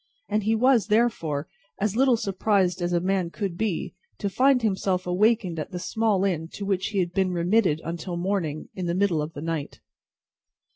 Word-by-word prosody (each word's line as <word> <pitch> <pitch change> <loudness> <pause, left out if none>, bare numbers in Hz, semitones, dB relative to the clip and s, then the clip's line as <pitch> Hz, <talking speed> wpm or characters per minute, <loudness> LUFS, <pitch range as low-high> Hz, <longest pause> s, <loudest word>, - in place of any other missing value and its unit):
And 210 0 0
he 220 +1 +3
was, 245 -1 +3
therefore, 190 -10 +1 0.3
as 210 0 0
little 255 -1 +4
surprised 190 -3 +1
as 175 0 -1
a 175 - +2
man 185 -1 0
could 195 -1 -4
be, 205 -2 -2 0.2
to 200 -2 -3
find 260 +2 +3
himself 190 -3 0
awakened 185 -2 +2
at 150 - -4
the 180 - -5
small 205 +1 0
inn 165 -4 -1
to 200 - -5
which 195 -2 0
he 205 - -4
had 175 -2 0
been 190 -1 +1
remitted 175 -1 +2
until 170 +1 -4
morning, 175 -5 -2
in 185 -2 -4
the 170 - 0
middle 185 -5 +2
of 150 +2 -5
the 145 - -7
night. 165 -3 -4
190 Hz, 190 wpm, -25 LUFS, 170-215 Hz, 0.3 s, little